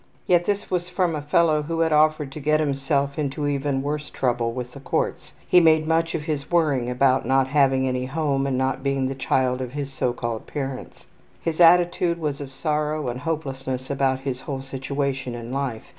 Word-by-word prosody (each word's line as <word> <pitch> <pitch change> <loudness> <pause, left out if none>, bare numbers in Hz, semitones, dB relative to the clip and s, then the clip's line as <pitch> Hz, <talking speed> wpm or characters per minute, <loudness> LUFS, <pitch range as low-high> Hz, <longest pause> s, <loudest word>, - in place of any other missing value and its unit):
Yet 175 -1 +3
this 205 0 -2
was 180 -1 -1
from 180 -2 0
a 150 - -3
fellow 155 +1 +3
who 165 +2 -2
had 160 -1 +2
offered 150 -2 +3
to 155 - -7
get 155 +1 +2
himself 140 -1 0
into 145 0 -2
even 140 -1 -1
worse 150 +1 -3
trouble 120 -3 0
with 125 0 -5
the 140 - -11
courts. 140 - -2 0.2
He 180 - +6
made 160 -2 +4
much 165 +1 +1
of 155 - -3
his 150 -3 -3
worrying 145 -8 +2
about 130 +1 +2
not 135 +2 +2
having 135 -2 +3
any 125 0 -1
home 140 -2 0
and 130 -2 0
not 130 0 0
being 135 -1 0
the 135 - -1
child 130 -1 0
of 125 -1 -5
his 140 -1 -4
so 125 -1 0
called 120 -2 -4
parents. 135 -3 -6 0.4
His 165 +1 -1
attitude 175 0 +5
was 150 -3 -3
of 135 -2 -7
sorrow 150 0 -1
and 120 +1 -4
hopelessness 135 -4 -4
about 135 -1 +1
his 130 -2 -4
whole 135 -1 -5
situation 135 -1 -3
in 120 0 -7
life. 135 -4 -3
140 Hz, 200 wpm, -24 LUFS, 130-155 Hz, 0.4 s, He